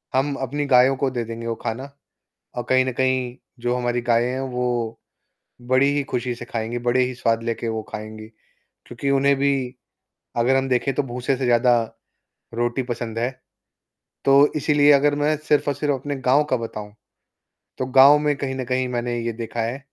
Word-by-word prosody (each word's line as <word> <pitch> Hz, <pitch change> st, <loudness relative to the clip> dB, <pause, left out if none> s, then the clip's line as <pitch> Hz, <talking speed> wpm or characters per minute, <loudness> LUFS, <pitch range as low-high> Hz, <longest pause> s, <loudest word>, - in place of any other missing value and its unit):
हम 140 Hz, +2 st, +1 dB
अपनी 145 Hz, +3 st, -2 dB
गायों 130 Hz, 0 st, +5 dB
को 135 Hz, 0 st, 0 dB
दे 120 Hz, -2 st, -2 dB
देंगे 115 Hz, +1 st, -6 dB
वो 115 Hz, -, -2 dB
खाना 130 Hz, +6 st, -5 dB, 0.7 s
और 120 Hz, -, -2 dB
कहीं 130 Hz, 0 st, +4 dB
न 130 Hz, -, -1 dB
कहीं 130 Hz, -1 st, 0 dB, 0.3 s
जो 120 Hz, +1 st, 0 dB
हमारी 120 Hz, -1 st, -1 dB
गायें 120 Hz, +1 st, +3 dB
हैं 130 Hz, +1 st, -3 dB
वो 125 Hz, 0 st, -2 dB, 1.0 s
बड़ी 130 Hz, +2 st, +4 dB
ही 145 Hz, -, 0 dB
खुशी 125 Hz, -2 st, -3 dB
से 120 Hz, -, -9 dB
खाएँगी, 115 Hz, 0 st, -4 dB
बड़े 120 Hz, +1 st, +1 dB
ही 125 Hz, 0 st, -2 dB
स्वाद 115 Hz, -1 st, 0 dB
लेके 115 Hz, 0 st, -3 dB
वो 110 Hz, -1 st, -2 dB
खाएँगी, 110 Hz, 0 st, -8 dB, 0.6 s
क्योंकि 120 Hz, +3 st, -3 dB
उन्हें 140 Hz, +1 st, +3 dB
भी 140 Hz, +1 st, +2 dB, 0.8 s
अगर 125 Hz, +3 st, +3 dB
हम 135 Hz, 0 st, 0 dB
देखें 130 Hz, +1 st, +1 dB
तो 145 Hz, -, +1 dB
भूसे 125 Hz, +1 st, -2 dB
से 135 Hz, -, -3 dB
ज़्यादा 120 Hz, 0 st, +4 dB, 0.7 s
रोटी 120 Hz, +2 st, -1 dB
पसंद 120 Hz, -2 st, -5 dB
है, 120 Hz, +2 st, 0 dB, 1.0 s
तो 140 Hz, +1 st, +6 dB
इसीलिए 145 Hz, -1 st, +4 dB
अगर 145 Hz, +1 st, +4 dB
मैं 145 Hz, +1 st, +1 dB
सिर्फ़ 150 Hz, -1 st, +1 dB
और -, -, +1 dB
सिर्फ़ 145 Hz, 0 st, 0 dB
अपने 145 Hz, +2 st, -4 dB
गाँव 135 Hz, +2 st, +3 dB
का 130 Hz, -, +2 dB
बताऊँ, 105 Hz, -3 st, -7 dB, 0.9 s
तो 130 Hz, -, -1 dB
गाँव 135 Hz, +3 st, +7 dB
में 150 Hz, 0 st, +1 dB
कहीं 135 Hz, -1 st, -3 dB
न 130 Hz, -1 st, -4 dB
कहीं 130 Hz, +1 st, -1 dB
मैंने 120 Hz, -1 st, -2 dB
ये 115 Hz, 0 st, -2 dB
देखा 115 Hz, +1 st, -5 dB
है 120 Hz, +4 st, -3 dB
125 Hz, 185 wpm, -22 LUFS, 120-135 Hz, 1.0 s, गाँव